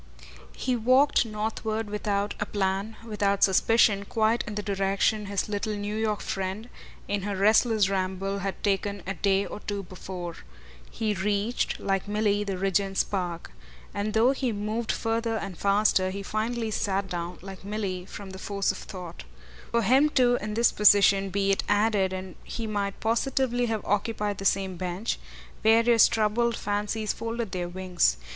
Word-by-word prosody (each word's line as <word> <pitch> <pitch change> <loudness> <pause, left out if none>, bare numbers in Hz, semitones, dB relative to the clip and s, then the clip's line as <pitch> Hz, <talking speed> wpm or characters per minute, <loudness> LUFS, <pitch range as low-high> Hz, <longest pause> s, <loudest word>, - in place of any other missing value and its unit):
He 255 - 0
walked 255 +2 +4
northward 220 0 -3
without 205 -1 -1
a 205 - -2
plan, 195 +2 -1
without 200 -3 0
suspicion, 200 +1 +4
quite 220 +2 +1
in 210 - -5
the 210 - -3
direction 200 +1 0
his 200 -1 -1
little 210 +1 -2
New 205 +1 -3
York 215 -1 -1
friend, 195 +4 -4 0.4
in 205 0 -1
her 200 +1 -3
restless 215 +1 +4
ramble, 195 +1 -2
had 195 0 -4
taken 200 -1 -1
a 195 - -2
day 195 0 +1
or - - -7
two 205 -1 -4
before. 180 -1 -7 0.5
He 220 -2 -1
reached, 205 +4 -1
like 195 0 -1
Milly, 205 0 +1
the 195 -2 -3
Regent's 195 +1 +1
Park; 175 - -4 0.4
and 210 +1 -2
though 230 +4 +5
he 265 -3 -1
moved 215 +2 -2
further 225 0 -1
and 195 -3 -5
faster 200 -1 +2
he 200 +1 -5
finally 220 +2 -2
sat 195 -1 -1
down, 175 -1 -4
like 195 -1 -9
Milly, 195 -3 -3
from 200 -2 -8
the 190 - -9
force 200 0 0
of - - -8
thought. 180 -3 -8 0.5
For 235 0 +1
him 265 +8 +5
too 250 -4 +3
in 210 0 -4
this 235 +1 +4
position, 200 -1 +5
be 195 +1 +1
it 195 - +1
added 205 -2 +2
and 185 -1 -6
he 230 - -5
might 205 -2 -2
positively 245 +1 +1
have 220 -2 -2
occupied 205 0 -1
the 195 - -6
same 190 -1 +1
bench 185 +4 -3 0.4
various 230 +1 +6
troubled 230 +2 +1
fancies 210 +1 -1
folded 230 -2 -4
their 180 -2 -3
wings. 180 - +1
205 Hz, 165 wpm, -27 LUFS, 195-220 Hz, 0.5 s, various